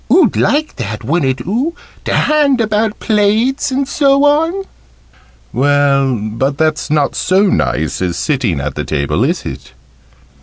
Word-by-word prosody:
Oo'd 335 Hz, +2 st, +4 dB
like 305 Hz, +2 st, 0 dB
that, 105 Hz, -2 st, -5 dB
wouldn't 135 Hz, -2 st, 0 dB
oo? 250 Hz, -, -2 dB, 0.3 s
To -, -, 0 dB
hand 290 Hz, -4 st, +2 dB
about 215 Hz, -1 st, 0 dB
plates, 220 Hz, +6 st, +1 dB
and 270 Hz, +1 st, -1 dB
so 280 Hz, 0 st, +2 dB
on." 325 Hz, +6 st, +1 dB, 0.9 s
"Well, 140 Hz, 0 st, +2 dB
but 115 Hz, +6 st, -2 dB
that's 155 Hz, 0 st, 0 dB
not 150 Hz, -2 st, +1 dB
so 190 Hz, +3 st, +2 dB
nice 180 Hz, -, 0 dB
as 90 Hz, -2 st, -2 dB
sitting 125 Hz, -, -1 dB
at 70 Hz, 0 st, -3 dB
the 75 Hz, -, -4 dB
table, 70 Hz, -2 st, -1 dB
is -, -, -1 dB
it?" 65 Hz, -, -8 dB
165 Hz, 145 wpm, -15 LUFS, -, 0.9 s, Oo'd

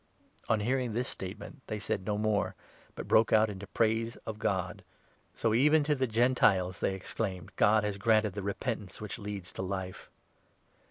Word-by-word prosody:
" -, -, -28 dB
On 110 Hz, -1 st, +3 dB
hearing 125 Hz, +1 st, 0 dB
this 125 Hz, +3 st, -1 dB
statement, 100 Hz, +8 st, -6 dB
they 110 Hz, -, -3 dB
said 100 Hz, -2 st, -3 dB
no 105 Hz, -1 st, 0 dB
more, 105 Hz, -1 st, 0 dB, 0.4 s
but -, -, -6 dB
broke 110 Hz, +1 st, +4 dB
out 110 Hz, 0 st, +5 dB
18 -, -, -4 dB
into 100 Hz, +1 st, -9 dB
praise 115 Hz, +1 st, +1 dB
of 110 Hz, -1 st, -5 dB
God. 95 Hz, -3 st, -1 dB, 0.5 s
"So 115 Hz, -1 st, +1 dB
even 150 Hz, +6 st, +5 dB
to 150 Hz, +1 st, +2 dB
the 130 Hz, -2 st, 0 dB
Gentiles," 110 Hz, -6 st, +3 dB
they 95 Hz, -, 0 dB
ex 95 Hz, -, -7 dB
claimed, 95 Hz, -6 st, -3 dB
"God 105 Hz, +1 st, +4 dB
has 105 Hz, -1 st, -2 dB
granted 110 Hz, -1 st, +3 dB
the 100 Hz, -, -4 dB
repentance 100 Hz, 0 st, -4 dB
which 105 Hz, +2 st, -6 dB
leads 100 Hz, -3 st, -5 dB
to -, -, -5 dB
Life 95 Hz, -1 st, -5 dB
105 Hz, 185 wpm, -31 LUFS, 95-115 Hz, 0.5 s, out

